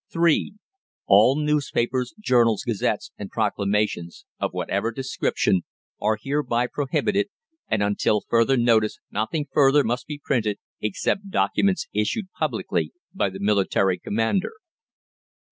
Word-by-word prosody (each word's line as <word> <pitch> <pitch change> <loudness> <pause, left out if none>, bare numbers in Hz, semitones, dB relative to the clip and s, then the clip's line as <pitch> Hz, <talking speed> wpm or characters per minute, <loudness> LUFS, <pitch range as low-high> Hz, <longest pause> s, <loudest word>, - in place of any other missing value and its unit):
(3) 170 +4 +2 0.5
ALL 105 +7 +6
NEWSPAPERS, 145 -3 0
JOURNALS, 120 - +3
GAZETTES, 115 -5 -1
AND 100 -2 -6
PROCLAMATIONS, 105 -4 -1
of - - -1
whatever 100 +4 -1
description, 120 -6 0 0.4
are 110 +1 +2
hereby 135 -2 0
prohibited, 195 +10 0 0.4
and 110 -2 +1
until 105 +1 +1
further 115 +3 +3
notice 115 -3 +3
nothing 145 +9 -1
further 145 0 +5
must 120 +2 -2
be 150 - -5
printed, 110 -6 0 0.2
except 195 - -1
documents 195 0 +1
issued 185 - -1
publicly - - -2 0.2
by 190 - 0
the 95 +1 -9
military 100 -2 +2
commander. 115 - -1
115 Hz, 115 wpm, -24 LUFS, 105-145 Hz, 0.5 s, ALL